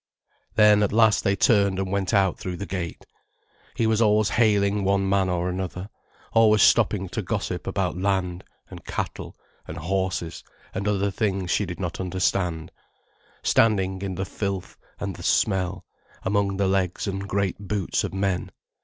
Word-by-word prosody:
Then 105 -1 +6
at 105 - +1
last 110 -1 +4
they 95 - +2
turned 100 -2 +3
and 95 -1 -2
went 100 -2 -1
out 95 -4 +2
through 90 -1 -5
the 100 - -5
gate. 90 -3 -5 0.7
He 115 -2 +1
was 110 0 +2
always 105 -2 +3
hailing 105 -2 +2
one 95 0 +1
man 95 -1 +2
or 90 0 -1
another, 90 +2 -4 0.4
always 110 -2 +5
stopping 105 -4 +3
to - - -3
gossip - - -3
about - - -1
land 95 -2 -1 0.2
and - - -11
cattle - - -5 0.3
and 80 - -7
horses 90 -1 -2 0.3
and 100 +2 -3
other 100 -1 +1
things 95 -4 -1
she 100 - +1
did 90 - -6
not 85 -3 -4
understand, 90 -2 -1 0.7
standing 95 -4 +2
in 95 -2 -3
the 95 +2 -3
filth 100 -1 -4 0.2
and 100 -2 -4
the - - -10
smell, 95 -2 0 0.4
among 100 0 0
the 100 -1 +1
legs 95 -2 0
and 100 -1 -3
great 100 -1 -1
boots 100 -2 -1
of - - -3
men. 95 -2 -1
95 Hz, 160 wpm, -24 LUFS, 95-100 Hz, 0.7 s, Then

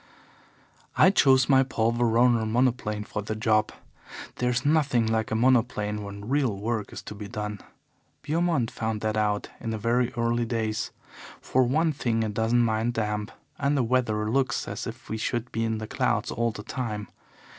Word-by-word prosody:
"I 185 - +7
chose 130 -8 +5
my 135 -2 +5
Paul 115 -4 +1
Veroner 120 -1 +3
monoplane 115 -3 0
for 105 - -4
the 105 +1 -4
job. 110 -1 +2 0.7
There's 125 +1 0
nothing 145 -6 +3
like 110 0 0
a 110 - -1
monoplane 115 -3 +2
when 100 0 -8
real 130 -6 +1
work 110 +1 -3
is - - -8
to - - -7
be 105 0 -8
done. 105 -2 -5 0.6
Beaumont 160 -6 0
found 110 -1 -3
that 110 0 -1
out 105 -1 0
in 115 -1 -3
very 120 +3 +1
early 120 -1 0
days. 110 -2 -2 0.5
For 130 - +1
one 155 +6 +2
thing 115 -4 0
it 110 -1 -3
doesn't 115 +2 +2
mind 110 +2 0
damp, 105 -1 -2 0.3
and 140 +1 +1
the 130 - +2
weather 115 -3 +1
looks 130 -1 0
as - - -5
if - - -8
we 110 - -3
should 120 +2 -2
be 115 - -1
in 110 -1 0
the 110 - -5
clouds - - 0
all 115 +1 0
the 105 -2 -7
time. 105 -6 -4
115 Hz, 175 wpm, -26 LUFS, 110-125 Hz, 0.7 s, I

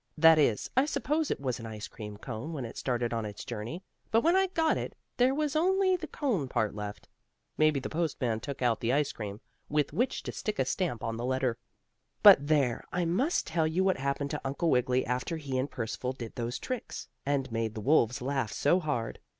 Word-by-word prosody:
That 160 0 +7
is, 115 -8 +2
I 260 +2 +5
suppose 300 +1 0
it - - -1
was 130 -3 -2
an 115 - -6
ice 110 -1 -6
cream 105 -2 -8
cone 125 +8 -6
when 135 -5 -4
it 115 - -8
started 120 -2 -1
on 115 -1 -1
its 105 -1 -6
journey, 120 - -5 0.3
but 225 - +4
when 335 +6 +4
I 385 0 +4
got 325 -3 +2
it - - -4 0.2
there 255 +2 +4
was 300 0 -1
only 375 +3 +3
the 335 -3 -5
cone 230 - -1
part 110 -4 0
left. 105 0 -6 0.5
Maybe 155 -2 +3
the 135 - -4
postman 140 -9 -1
took 140 +2 -5
out 115 -3 +2
the 120 +2 0
ice 145 0 +2
cream, 105 -1 -6 0.3
with 150 -1 +1
which 245 +3 0
to - - -4
stick 215 - -3
a 130 - +2
stamp 130 - -1
on 115 0 -2
the 120 - -4
letter. 130 -2 0 0.6
But 145 - +9
there, 140 -6 +2
I 180 -1 0
must 245 - +1
tell 160 -1 +1
you 170 +4 +1
what 190 -1 +2
happened 140 +1 -2
to - - -3
Uncle 140 +5 0
Wiggily 125 +1 +2
after 125 +7 -2
he 140 -4 -4
and 135 +3 -1
Percival 125 +2 -3
did 120 -4 -7
those 120 0 -3
tricks, 255 -2 -5 0.2
and 135 -2 -1
made 115 -1 -2
the - - -4
wolves 125 0 +3
laugh 135 -5 -1
so 145 - +3
hard. 145 -9 -2
140 Hz, 215 wpm, -30 LUFS, 120-175 Hz, 0.6 s, But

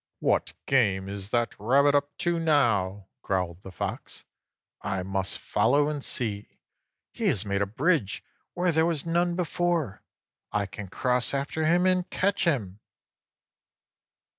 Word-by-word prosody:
"What - - +1
game 100 -8 +2
is 100 0 -3
that 120 +1 +1
rabbit 140 +7 +4
up 145 0 0
to 170 -1 +2
now?" 110 - +2 0.2
growled 90 -2 -2
the 95 - -10
Fox. 90 - -5 0.6
"I 95 -1 -2
must 95 0 -2
follow 140 +8 +2
and 145 -2 -3
see. 105 -4 -2 0.5
He - - -2
has 100 - +1
made 100 0 -1
a 100 - +1
bridge 120 - 0 0.3
where 180 0 +2
there 160 +1 +3
was 165 -3 -1
none 170 +1 +1
before. 170 - -1 0.5
I 105 -1 0
can 100 0 -8
cross 125 +6 0
after 145 +3 -1
him 175 +3 +3
and 185 -1 +2
catch 195 0 +1
him!" 105 - 0
125 Hz, 140 wpm, -27 LUFS, 100-165 Hz, 0.6 s, rabbit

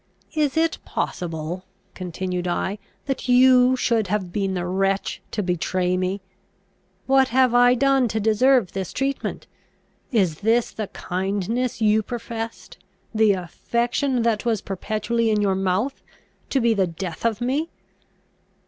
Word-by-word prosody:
"Is 305 -1 0
it 325 0 +1
possible," 165 +1 -4 0.3
continued 180 0 -4
I, 190 +3 -1 0.3
"that 270 -2 -3
you 250 0 +6
should 230 -4 +1
have 185 -2 -2
been 195 -2 -1
the 175 -1 -2
wretch 195 +2 -1
to 210 - -2
betray 180 +1 0
me? 185 +2 -1 0.8
What 265 0 +4
have 255 0 +3
I 245 0 +6
done 270 -1 +3
to 220 0 -2
deserve 220 0 +3
this 190 -2 -4
treatment? 275 +1 -2 0.7
Is 185 - +1
this 225 +3 +2
the 215 -2 -4
kindness 200 +8 -2
you 215 0 +4
professed? 225 -3 -6 0.3
the 215 -2 +4
affection 235 - -1
that 225 -3 +1
was 225 -4 0
perpetually 215 +4 -1
in 215 -1 +2
your 200 -2 +2
mouth? 195 +8 -1 0.5
to 270 - +2
be 235 -2 +3
the 195 -3 +1
death 170 0 -6
of 230 -2 +1
me!" 275 +7 -1
215 Hz, 140 wpm, -23 LUFS, 185-245 Hz, 0.8 s, you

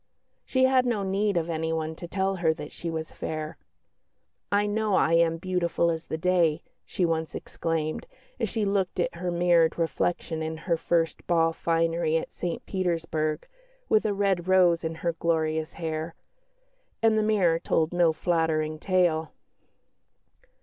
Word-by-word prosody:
She 260 -1 +1
had 260 -1 +4
no 220 -5 0
need 195 0 0
of 165 -1 0
anyone 160 -1 -2
to 175 - -7
tell 190 +1 -1
her 160 -2 +2
that 150 - -8
she 170 - -6
was 160 -1 -4
fair. 155 0 -5 1.0
"I 205 +1 +3
know 210 -1 0
I 165 - +3
am 165 0 +3
beautiful 170 -1 0
as 165 0 -5
the 160 - -3
day," 170 -2 +2 0.2
she 180 - 0
once 160 -1 -2
exclaimed, 165 - -3 0.3
as - - 0
she 220 -3 -1
looked 195 -2 0
at 175 - 0
her 180 +1 -4
mirrored 175 -1 +3
reflection 165 -1 -1
in 160 0 -3
her 170 +1 0
first 165 0 -1
ball 165 -1 +3
finery 165 -1 +1
at - - -5
St 175 -1 -4
Petersburg, 165 -4 -1 0.4
with 215 - +4
a 205 - 0
red 195 -3 0
rose 180 -3 +4
in 160 0 -3
her 170 - +2
glorious 160 -1 -1
hair; 160 0 -4 0.9
and 225 -1 +5
the 215 - +3
mirror 195 -6 +2
told 165 0 0
no 175 -2 +4
flattering 155 -2 0
tale. 175 -4 +1
170 Hz, 155 wpm, -27 LUFS, 160-185 Hz, 1.0 s, and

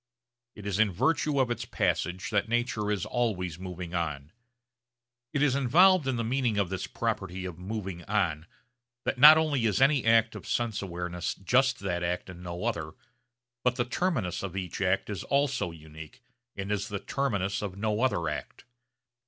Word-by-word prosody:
It 105 - -10
is 100 0 -1
in 110 -2 +4
virtue 145 - +1
of 125 -2 +2
its 120 - -2
passage 90 +1 -1
that 105 +1 +1
nature 120 -3 0
is 105 -4 -1
always 90 -9 -1
moving 90 -2 -7
on. 75 -4 -3 1.0
It 145 -1 +1
is 140 -3 +3
involved 155 +5 +5
in 130 - +1
the 115 - -1
meaning 120 -2 0
of 100 -3 +1
this 95 -1 -3
property 95 -5 -3
of 90 -2 -7
'moving 95 -2 -5
on' 90 -6 0 0.6
that 125 - -1
not 150 +3 +11
only 150 -7 +1
is 100 -3 +1
any 135 0 +4
act 115 0 +4
of - - -9
sense 115 -3 -1
awareness 90 -2 -4
just 130 +6 +2
that 90 -3 -2
act 90 +1 -2
and 90 -1 -11
no 90 0 -5
other, - - -2 0.7
but 125 0 +2
the 120 -2 0
terminus 125 - -1
of 95 -1 -5
each 90 0 -4
act 95 0 +1
is 105 -3 -4
also 140 -8 +1
unique 80 +8 -12 0.3
and 100 0 -4
is 105 0 -1
the 100 - -3
terminus 100 -9 -1
of 100 -2 -5
no 105 +1 -1
other 85 -11 +1
act. - - -5
105 Hz, 175 wpm, -28 LUFS, 90-125 Hz, 1.0 s, not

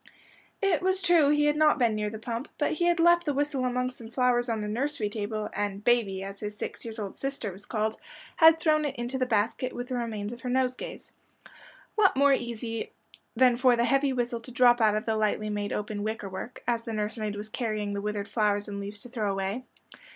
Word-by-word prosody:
It 365 -6 +3
was 375 0 +2
true 340 -4 +5
he 295 0 +3
had 295 0 +3
not 305 0 +4
been 235 -4 +2
near 210 0 -1
the 220 - -7
pump, 235 +4 -5
but 295 - +1
he 345 +2 0
had 345 0 +3
left 345 +1 +5
the 290 -4 -1
whistle 280 -2 0
among 250 0 0
some 235 -3 -9
flowers 245 0 +2
on 225 -2 -1
the 210 - -3
nursery 240 0 -1
table, 210 0 -3
and 205 -1 -3
"baby," 210 -5 +2
as 195 0 -7
his 210 0 -5
six - - -5
years 225 -1 -7
old 205 -3 -5
sister 275 -6 -2
was 195 +3 -9
called, 220 -1 -1 0.4
had 325 -1 +7
thrown 310 -2 +3
it 285 - -3
into 240 +2 -3
the 255 - +1
basket 230 +3 0
with 245 +1 -6
the 255 - -2
remains 225 -3 -3
of 240 - -11
her 250 - -4
nosegays. 255 0 -2 0.8
What 395 -9 +3
more 280 0 +5
easy 230 -2 -3 0.4
than 245 0 +5
for 250 -1 +5
the 235 0 +2
heavy 275 +1 +2
whistle 245 -2 -1
to 235 +2 -12
drop 245 -1 +5
out 215 -1 +4
of 215 - -2
the 225 - 0
lightly 215 0 0
made 205 -1 -2
open 210 0 -3
wicker 215 -1 -3
work, 190 +6 -7
as 235 -1 +1
the 230 -1 -6
nursemaid 215 0 -2
was 210 +1 -6
carrying 215 -3 -2
the 200 - -3
withered 210 0 -3
flowers 210 -2 +1
and 200 -1 -5
leaves 205 +1 -6
to 245 - -8
throw 220 -5 -1
away? 195 +6 -3
235 Hz, 225 wpm, -28 LUFS, 210-260 Hz, 0.8 s, had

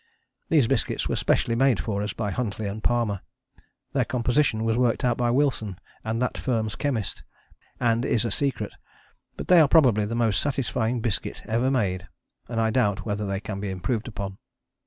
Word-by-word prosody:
These 150 -6 +5
biscuits 135 - 0
were - - -1
specially 115 - +1
made 130 -1 +3
for 100 -3 -2
us 105 - -2
by 105 -3 -3
Huntley 110 -1 -3
and 100 +2 -4
Palmer: 115 -5 +1 0.7
their - - +3
composition 120 -1 +1
was 115 0 +1
worked 120 0 +1
out 120 -1 +3
by 120 0 +1
Wilson 120 -7 +1 0.3
and 110 +1 -2
that 125 0 -1
firm's 110 -4 -1
chemist, 125 -9 -2 0.6
and 120 -1 +2
is 120 -2 +1
a 115 - -1
secret. 130 -4 -1 0.6
But - - -6
they 180 -1 +7
are 155 - +7
probably 125 -9 +5
the 115 +3 -3
most 115 -4 +2
satisfying 125 -4 -1
biscuit 110 -4 -2
ever 120 +4 +1
made, 95 -8 0 0.4
and 115 -2 -2
I 110 0 +2
doubt 105 -5 +1
whether 105 -1 -2
they 100 0 -1
can 110 -3 -5
be 100 0 -3
improved 105 +5 -2
upon. 100 -4 -6
115 Hz, 180 wpm, -25 LUFS, 105-125 Hz, 0.7 s, they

